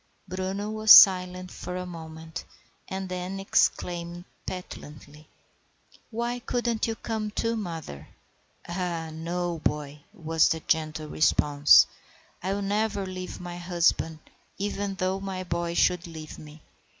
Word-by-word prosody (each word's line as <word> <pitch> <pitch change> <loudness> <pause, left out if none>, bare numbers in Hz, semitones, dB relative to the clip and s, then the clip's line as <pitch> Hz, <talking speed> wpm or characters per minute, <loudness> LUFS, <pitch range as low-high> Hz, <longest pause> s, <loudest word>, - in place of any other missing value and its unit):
Bruno 190 +3 -3
was 215 0 -3
silent 185 -2 +8
for 180 - -6
a 180 - -4
moment, 160 -2 -8 0.4
and 190 0 -4
then 185 +1 -4
exclaimed 175 -2 0 0.2
petulantly,— 150 -4 -9 0.8
"Why 235 +2 -2
couldn't 240 -2 -1
you 225 - -2
come 220 -2 -3
too, 230 +2 -1
mother?" 165 - -6 0.6
"Ah, 170 -2 -3
no, 170 +1 -3
boy," 150 -1 -2
was 160 -2 +2
the 160 - -1
gentle 155 -1 -1
response. 145 -1 +5 0.6
"I 190 - -2
will 200 - -3
never 205 0 0
leave 185 -1 -6
my 175 -1 -7
husband, 170 -2 +1 0.4
even 200 0 -2
though 185 +1 -1
my 190 -1 -4
boy 170 -1 -2
should 180 0 +2
leave 160 -2 -9
me. 150 0 -13
180 Hz, 125 wpm, -27 LUFS, 160-195 Hz, 0.8 s, silent